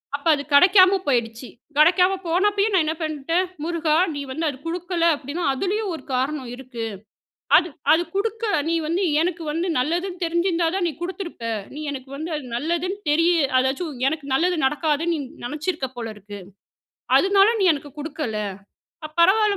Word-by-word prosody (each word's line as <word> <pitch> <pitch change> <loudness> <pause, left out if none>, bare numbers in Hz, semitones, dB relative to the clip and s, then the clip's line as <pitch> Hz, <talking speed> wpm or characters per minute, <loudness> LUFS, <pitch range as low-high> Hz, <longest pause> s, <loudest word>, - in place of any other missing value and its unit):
அப்ப 285 +2 -5
அது 285 - -5
கடைக்காம 370 +5 +7
போயிடுச்சு. 235 -2 -1 0.3
கடைக்காம 360 +4 +5
போனப்பயும் 400 +4 +1
நான் 355 -4 +4
என்ன 315 - 0
பண்ணிட்டேன். 315 +3 0 0.2
"முருகா! 325 -2 0 0.2
நீ 285 - -4
வந்து 320 +5 -2
அது 280 - -3
குடுக்கல 345 +1 -2
அப்படின்னா. 290 +5 -5
அதுலயும் 390 +7 -1
ஒரு - - -10
காரணம் 260 0 -1
இருக்கு. 245 -3 -6 0.7
அது 345 - +3 0.2
அது 320 +2 +4
குடுக்க 445 +3 -1 0.2
நீ 335 - +1
வந்து 340 +5 0 0.2
எனக்கு 340 0 -1
வந்து 330 +4 -1
நல்லதுன்னு 350 +7 -2
தெரிஞ்சிருந்தா 340 0 +1
தான், 375 -3 0
நீ - - -3
குடுத்துருப்ப. 350 - -6 0.3
நீ 300 - -6
எனக்கு 265 -2 -7
வந்து 315 +4 -5
அது 295 - -6
நல்லதுன்னு 345 +8 -2
தெரிய 330 +3 +4 0.3
அதாச்சும் 265 +1 -2
எனக்கு 310 -1 -3
நல்லது 350 +3 +2
நடக்காதுன்னு, 305 +4 +1
நீ - - -2 0.3
நினைச்சிருக்க 300 0 -3
போல 225 -2 -5
இருக்கு. 205 0 -10 0.8
அதனால 395 +1 +4
நீ 380 - +3
எனக்கு 285 0 -9
குடுக்கல. 295 -7 -4 0.7
அ - - -14
பரவால்ல 405 +4 +4
330 Hz, 155 wpm, -23 LUFS, 285-365 Hz, 0.8 s, கடைக்காம